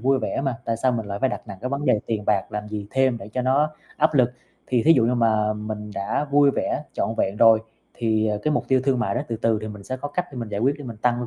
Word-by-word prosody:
vui 135 Hz, +3 st, +3 dB
vẻ 135 Hz, -, -2 dB
mà, 130 Hz, -4 st, -1 dB
tại 115 Hz, -1 st, -1 dB
sao 125 Hz, +2 st, +1 dB
mình 110 Hz, -3 st, -2 dB
lại 100 Hz, 0 st, -4 dB
phải 130 Hz, +3 st, +2 dB
đặt -, -, -4 dB
nặng 100 Hz, -2 st, -8 dB
cái 130 Hz, -, -3 dB
vấn 140 Hz, +1 st, -2 dB
đề 105 Hz, -, +3 dB
tiền 105 Hz, -2 st, -2 dB
bạc 100 Hz, -3 st, +1 dB
làm 105 Hz, 0 st, -4 dB
gì 105 Hz, -1 st, -5 dB
thêm 130 Hz, -3 st, +2 dB
để 100 Hz, -1 st, -9 dB
cho 125 Hz, +4 st, -2 dB
nó 140 Hz, +4 st, +2 dB, 0.3 s
áp 155 Hz, 0 st, +2 dB
lực. 125 Hz, -3 st, +4 dB, 0.4 s
Thì 125 Hz, -3 st, +2 dB
thí 165 Hz, -, +7 dB
dụ 125 Hz, -6 st, +4 dB
như 125 Hz, -, +2 dB
mà 110 Hz, -2 st, +2 dB
mình 105 Hz, 0 st, -5 dB
đã 100 Hz, +9 st, -1 dB
vui 145 Hz, 0 st, +5 dB
vẻ 145 Hz, -, -2 dB
trọn 110 Hz, -, -1 dB
vẹn 100 Hz, +2 st, 0 dB
rồi, 110 Hz, 0 st, +6 dB, 0.3 s
thì, 110 Hz, -2 st, +1 dB
à, 105 Hz, -, 0 dB
cái 150 Hz, -, +1 dB
mục -, -, -1 dB
tiêu 130 Hz, -1 st, +4 dB
thương 135 Hz, -3 st, +2 dB
mại 100 Hz, -5 st, 0 dB
đó -, -, 0 dB
từ 115 Hz, -, -2 dB
từ 110 Hz, 0 st, +1 dB
thì 110 Hz, -, -4 dB
mình 105 Hz, -1 st, -9 dB
sẽ 130 Hz, -, -4 dB
có 145 Hz, +3 st, -5 dB
cách 175 Hz, +5 st, -2 dB
để -, -, -9 dB
mình 115 Hz, -2 st, -4 dB
giải 105 Hz, 0 st, -3 dB
quyết 135 Hz, +4 st, +2 dB
để 145 Hz, -, -8 dB
mình 115 Hz, -3 st, -7 dB
tăng 120 Hz, +2 st, 0 dB
115 Hz, 305 wpm, -23 LUFS, 105-130 Hz, 0.4 s, thí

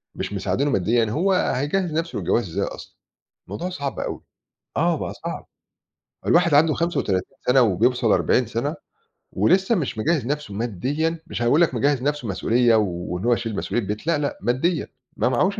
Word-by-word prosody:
مش -, -, -4 dB
مساعدينه 140 Hz, +2 st, 0 dB
ماديًا، 115 Hz, +4 st, +2 dB
هو 185 Hz, -, +2 dB
هيجهّز 175 Hz, +1 st, 0 dB
نفْسه 165 Hz, +2 st, -2 dB
للجواز 115 Hz, -6 st, 0 dB
إزاي 80 Hz, -, -1 dB
أصلًا؟! -, -, -9 dB, 0.5 s
الموضوع 105 Hz, -, -4 dB
صعب 140 Hz, -7 st, -4 dB
أوي، -, -, -4 dB, 0.6 s
آه -, -, +2 dB
بقى -, -, -4 dB
صعب، -, -, -5 dB, 0.8 s
الواحد 170 Hz, -3 st, +4 dB
عنده 155 Hz, +1 st, +5 dB
35 135 Hz, -, -1 dB
سَنة 125 Hz, +1 st, +5 dB
وبيوصل 115 Hz, +2 st, +2 dB
40 125 Hz, -, +2 dB
سَنة 120 Hz, +7 st, -2 dB, 0.6 s
ولسه 190 Hz, +5 st, +3 dB
مش 150 Hz, -, -2 dB
مجهز 145 Hz, +3 st, +1 dB
نفْسه 145 Hz, -7 st, -3 dB
ماديًا، 135 Hz, -, -2 dB
مش 120 Hz, -, -5 dB
هيقول 120 Hz, +7 st, +3 dB
لك 170 Hz, -, +3 dB
مجهز 140 Hz, +2 st, +1 dB
نفْسه 145 Hz, -3 st, -1 dB
مسؤولية، 115 Hz, +4 st, +2 dB
وإن 90 Hz, -2 st, -1 dB
هو 120 Hz, -, +4 dB
يشيل 115 Hz, -2 st, -2 dB
مسؤولية 110 Hz, +1 st, -2 dB
بيت 105 Hz, -, -4 dB
لأ، 165 Hz, -2 st, +3 dB
لأ، 145 Hz, -1 st, -2 dB
ماديًا 155 Hz, +8 st, 0 dB, 0.3 s
ما -, -, +2 dB
معهوش 190 Hz, -, +1 dB
130 Hz, 165 wpm, -23 LUFS, 115-160 Hz, 0.8 s, عنده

